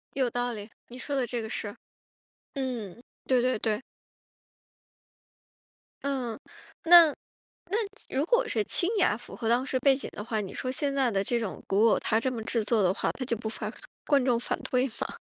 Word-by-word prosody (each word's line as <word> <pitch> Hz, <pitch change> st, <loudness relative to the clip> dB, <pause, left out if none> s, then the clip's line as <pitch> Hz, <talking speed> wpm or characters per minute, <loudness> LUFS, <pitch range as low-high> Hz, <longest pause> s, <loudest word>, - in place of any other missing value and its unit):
有 260 Hz, -3 st, +2 dB
道 245 Hz, +1 st, -1 dB
理， 210 Hz, -2 st, -7 dB, 0.2 s
你 245 Hz, -, -10 dB
说 285 Hz, +2 st, -4 dB
的 265 Hz, -2 st, +1 dB
这 240 Hz, -1 st, -3 dB
个 220 Hz, -, -5 dB
是， 205 Hz, -1 st, -4 dB, 0.8 s
嗯， 240 Hz, -, -4 dB, 0.2 s
对 255 Hz, -2 st, +3 dB
对 255 Hz, -2 st, +1 dB
对。 215 Hz, -1 st, 0 dB, 2.2 s
嗯， 255 Hz, -5 st, -2 dB, 0.5 s
那 340 Hz, -1 st, +10 dB, 0.6 s
那 405 Hz, -, +1 dB, 0.3 s
如 270 Hz, +3 st, 0 dB
果 480 Hz, +7 st, +2 dB
是 215 Hz, -2 st, 0 dB
清 345 Hz, -, 0 dB
雅 285 Hz, -, +3 dB
符 235 Hz, -, -11 dB
合 230 Hz, -2 st, -2 dB
当 240 Hz, +3 st, +3 dB
时 260 Hz, -1 st, 0 dB
背 275 Hz, +1 st, +5 dB
景 265 Hz, -, -6 dB
的 210 Hz, -, -6 dB
话， 220 Hz, -1 st, -1 dB
你 195 Hz, -, -5 dB
说 255 Hz, -, -2 dB
现 280 Hz, +1 st, -1 dB
在 265 Hz, -3 st, +2 dB
的 195 Hz, -3 st, +1 dB
这 240 Hz, +4 st, 0 dB
种 220 Hz, -5 st, -4 dB
古 205 Hz, +4 st, +4 dB
偶 -, -, +4 dB
它 220 Hz, -, +1 dB
这 255 Hz, +3 st, 0 dB
么 230 Hz, -3 st, -4 dB
制 225 Hz, -1 st, 0 dB
作 220 Hz, -1 st, +2 dB
的 180 Hz, -1 st, +3 dB
话， -, -, -1 dB
它 255 Hz, -, -5 dB
就 235 Hz, -2 st, -1 dB
不怕 220 Hz, -1 st, -4 dB, 0.4 s
观 285 Hz, -3 st, +4 dB
众 245 Hz, -2 st, +3 dB
反 -, -, -2 dB
对 255 Hz, +1 st, +3 dB
吗？ -, -, -4 dB
245 Hz, 210 characters per minute, -28 LUFS, 220-265 Hz, 2.2 s, 那